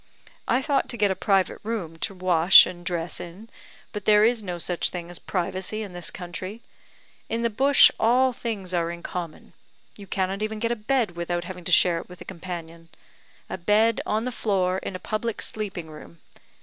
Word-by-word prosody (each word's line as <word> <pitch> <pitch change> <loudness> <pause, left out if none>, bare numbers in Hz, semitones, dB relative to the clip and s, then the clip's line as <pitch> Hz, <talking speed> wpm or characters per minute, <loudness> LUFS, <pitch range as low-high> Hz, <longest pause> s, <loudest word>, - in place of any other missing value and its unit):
I 260 - +2
thought 285 -2 0
to 240 - -3
get 205 -2 +3
a - - -1
private 195 -2 +1
room 200 -8 -4
to 195 - -3
wash 180 -1 +7
and 175 -1 -8
dress 170 -2 -2
in, 190 +7 -10 0.4
but 210 -2 -6
there 210 0 +6
is 235 0 +2
no 180 -4 -5
such 175 0 0
thing 175 -1 -7
as 175 - -5
privacy 190 +3 -2
in 200 -4 -9
this 175 -1 -1
country. 185 +5 -7 0.7
In 230 +1 -1
the 235 - +1
bush, 275 +6 +6
all 255 +3 +3
things 205 -6 -5
are 170 -1 0
in 170 0 -7
common; 170 -3 -6 0.4
you 200 -1 -11
cannot 190 +2 -2
even 215 0 -2
get 230 +2 -1
a - - +1
bed 235 -1 0
without 175 0 -2
having 180 0 -8
to - - -3
share 175 0 +5
it - - -11
with 180 -1 -12
a - - -10
companion. 170 -2 -8 0.6
A - - -6
bed 215 +4 +3
on 215 +2 0
the 255 - -2
floor 190 -5 0
in 190 - -6
a - - -5
public 220 +2 -3
sleeping 200 -6 -5
room! 155 +2 -12
190 Hz, 200 wpm, -25 LUFS, 175-220 Hz, 0.7 s, wash